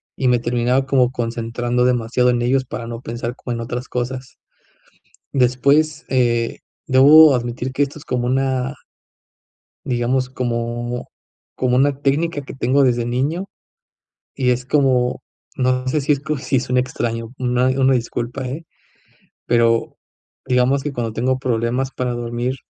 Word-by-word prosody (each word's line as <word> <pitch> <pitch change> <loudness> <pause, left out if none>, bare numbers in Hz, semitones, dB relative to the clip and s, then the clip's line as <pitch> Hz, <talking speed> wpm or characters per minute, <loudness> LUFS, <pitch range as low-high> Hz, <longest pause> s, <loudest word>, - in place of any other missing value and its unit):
y 130 - 0
me 125 -1 +4
terminaba 120 +2 +1
como 130 -2 +2
concentrando 120 +1 -2
demasiado 125 0 +2
en 120 -1 +1
ellos 130 +2 +2
para 120 -2 -6
no 115 0 -6
pensar 120 0 -5
como 125 - -5
en - - -5
otras 120 +2 -5
cosas. 125 +1 -4 1.0
Después, 140 +5 +2
eh, 120 -3 +1 0.3
debo 145 +3 +8
admitir 120 +1 -2
que 135 +2 +1
esto 140 +2 -5
es - - -13
como 125 -1 -1
una 130 +1 0 1.1
digamos, 125 0 0
como 120 -1 -3 0.5
como 125 -1 +1
una 140 +1 +2
técnica 145 +3 0
que 135 - -10
tengo 135 +2 +2
desde 120 -2 +2
niño 135 +10 -1 0.9
y, 130 -2 +1
es 125 0 -1
como, 130 -3 +2 0.4
no 130 0 +1
sé 150 +3 +1
si 145 +2 +2
es 140 - -3
co 155 0 -2
si 130 0 0
suene 125 0 0
extraño, 115 -2 -3
una 125 0 +1
una 130 0 +3
disculpa, 120 +2 -3
¿eh?, 150 +6 -6 0.8
pero 115 -1 +2 0.5
digamos 130 +2 +2
que 150 0 -3
cuando 115 -3 -2
tengo 130 +3 0
problemas 125 +1 -1
para 125 -2 -3
dormir 120 +1 -2
125 Hz, 150 wpm, -20 LUFS, 120-135 Hz, 1.1 s, debo